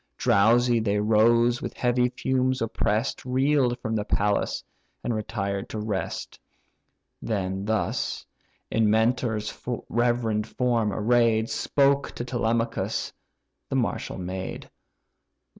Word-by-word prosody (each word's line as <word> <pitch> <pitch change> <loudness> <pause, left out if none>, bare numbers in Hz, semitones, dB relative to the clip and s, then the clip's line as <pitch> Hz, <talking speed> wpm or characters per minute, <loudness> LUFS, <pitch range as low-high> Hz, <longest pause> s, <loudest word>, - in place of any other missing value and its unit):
Drowsy 120 +4 +4
they 105 -2 0
rose, 115 +3 +3
with - - -5
heavy 125 0 +2
fumes 130 +1 0
oppress'd, 110 0 -1
Reel'd 130 -1 +2
from 110 -2 -3
the 105 - 0
palace, 105 0 0 0.4
and 120 - -1
retired 100 -2 -3
to - - -5
rest. 105 -3 -4 0.8
Then 95 -2 -2
thus, 110 0 -1 0.5
in 110 -2 +3
Mentor's 110 -1 +1 0.3
reverend 120 -3 +1
form 120 -4 0
array'd, 115 +1 +2
Spoke 140 0 +2
to 120 - -5
Telemachus 115 -1 -1 0.6
the - - -2
martial - - -1
maid. 95 +1 -6
115 Hz, 110 wpm, -26 LUFS, 105-120 Hz, 0.8 s, Drowsy